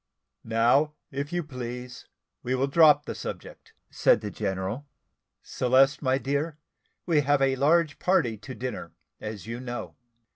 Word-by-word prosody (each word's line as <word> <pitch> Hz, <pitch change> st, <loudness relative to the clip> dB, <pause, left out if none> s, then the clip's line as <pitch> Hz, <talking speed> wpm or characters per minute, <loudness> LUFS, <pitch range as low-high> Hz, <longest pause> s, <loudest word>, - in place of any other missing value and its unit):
"Now, 120 Hz, +7 st, +3 dB, 0.2 s
if 140 Hz, +1 st, -4 dB
you 175 Hz, 0 st, -1 dB
please 125 Hz, -3 st, -7 dB, 0.3 s
we 130 Hz, +1 st, -1 dB
will 130 Hz, +1 st, +1 dB
drop 150 Hz, 0 st, +5 dB
the -, -, -4 dB
subject," -, -, -8 dB, 0.2 s
said -, -, +3 dB
the 105 Hz, -2 st, -5 dB
general. 100 Hz, +6 st, -3 dB, 0.6 s
"Celeste, 135 Hz, +2 st, +3 dB
my 130 Hz, -2 st, +2 dB
dear, 145 Hz, +3 st, -2 dB, 0.5 s
we 160 Hz, -4 st, +3 dB
have 145 Hz, 0 st, +2 dB
a 135 Hz, 0 st, +2 dB
large 150 Hz, +3 st, +2 dB
party 155 Hz, -12 st, +2 dB
to 125 Hz, +5 st, -9 dB
dinner, 125 Hz, +3 st, -6 dB, 0.3 s
as 105 Hz, -3 st, -7 dB
you 115 Hz, +2 st, -5 dB
know. 120 Hz, -1 st, -6 dB
130 Hz, 145 wpm, -27 LUFS, 120-145 Hz, 0.6 s, drop